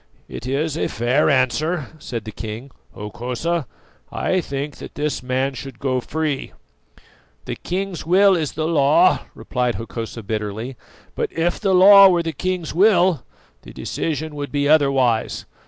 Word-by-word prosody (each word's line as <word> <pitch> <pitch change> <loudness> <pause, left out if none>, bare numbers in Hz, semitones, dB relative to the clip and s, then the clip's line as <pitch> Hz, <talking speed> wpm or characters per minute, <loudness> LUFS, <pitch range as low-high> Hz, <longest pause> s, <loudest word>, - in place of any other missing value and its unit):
"It - - -8
is 145 +3 -1
a - - 0
fair 125 +7 +1
answer," 140 +4 +1
said 115 -6 -6
the 110 - -6
king. 110 +5 -7 0.2
"Hokosa, 125 +9 -3 0.4
I 185 0 0
think 140 -1 -5
that - - -10
this 150 0 -2
man 130 +2 -1
should 130 -1 -8
go 130 -1 -1
free." 155 0 -3 0.9
"The - - -4
king's 190 0 -4
will 190 +3 +5
is 155 -4 -2
the 155 0 -2
law," 150 -3 +3
replied 125 -1 -2
Hokosa 115 0 -6
bitterly; 110 +4 -4 0.4
"but - - -2
if 170 +1 -1
the 195 -3 +2
law 195 +1 +9
were 175 -2 +2
the 165 -1 -3
king's 180 +1 -3
will, 180 - +4 0.4
the - - -13
decision 160 -1 -3
would 145 -1 -5
be 145 -1 0
otherwise. 135 -6 +2
145 Hz, 150 wpm, -21 LUFS, 125-170 Hz, 0.9 s, law